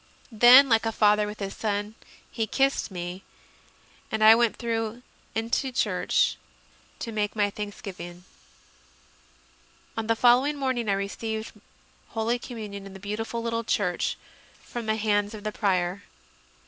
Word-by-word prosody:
Then, 245 +5 +8
like 225 -2 +3
a - - 0
father 210 -1 +3
with 210 +1 -7
his 195 -1 -4
son, 205 0 -2 0.4
he 225 -1 -2
kissed 270 +3 +1
me, 180 0 -6 0.9
and 220 0 0
I 220 +1 +10
went 235 -1 +2
through 230 0 -3 0.3
into 230 +4 -1
church 250 - +1 0.6
to 230 - -5
make 210 -1 -2
my 205 -1 +1
thanksgiving. 185 -4 -7 1.7
On 225 -1 -3
the 225 - +3
following 250 +5 +4
morning 260 -5 -1
I - - +3
received 220 +3 -3 0.6
Holy 230 +1 -1
Com 245 -1 -8
munion 200 -2 -7
in 195 - -11
the - - -9
beautiful 225 +4 -4
little 230 0 -1
church, 190 -5 0 0.5
from 235 -2 -6
the 220 - +2
hands 205 -1 0
of 210 - -10
the 215 - -2
Prior. 185 -2 0
220 Hz, 145 wpm, -26 LUFS, 205-230 Hz, 1.7 s, I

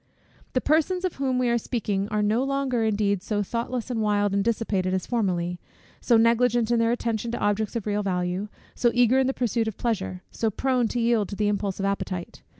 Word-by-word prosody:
The 255 - +1
persons 340 +5 +1
of 365 - -3
whom 265 -2 0
we 250 -1 +1
are 235 0 +2
speaking 205 -4 -2
are 210 0 0
no 220 +5 +2
longer, 275 -3 0
indeed, 205 -3 +1
so 205 +1 -1
thoughtless, 235 +3 -3
and 225 -2 -1
wild, 205 -1 +1
and 200 0 +2
dissipated, 200 -5 0
as 185 - -2
formerly; 180 -7 -1 0.4
so 235 - +3
negligent 235 0 +3
in 235 - +3
their 230 0 +3
attention 235 -1 -1
to - - -1
objects 205 +2 0
of 230 - -2
real 210 0 0
value; 180 0 -1 0.3
so 240 - +2
eager 245 +1 +4
in 265 - +2
the - - +2
pursuit 235 -3 -1
of 220 - -4
pleasure; 190 -6 -2
so 225 - 0
prone 250 +2 +1
to 240 - -2
yield 230 -3 +2
to 200 - -5
the 210 0 0
impulse 200 -2 -2
of 195 - -1
appetite. 190 -3 -3
225 Hz, 215 wpm, -25 LUFS, 200-240 Hz, 0.4 s, eager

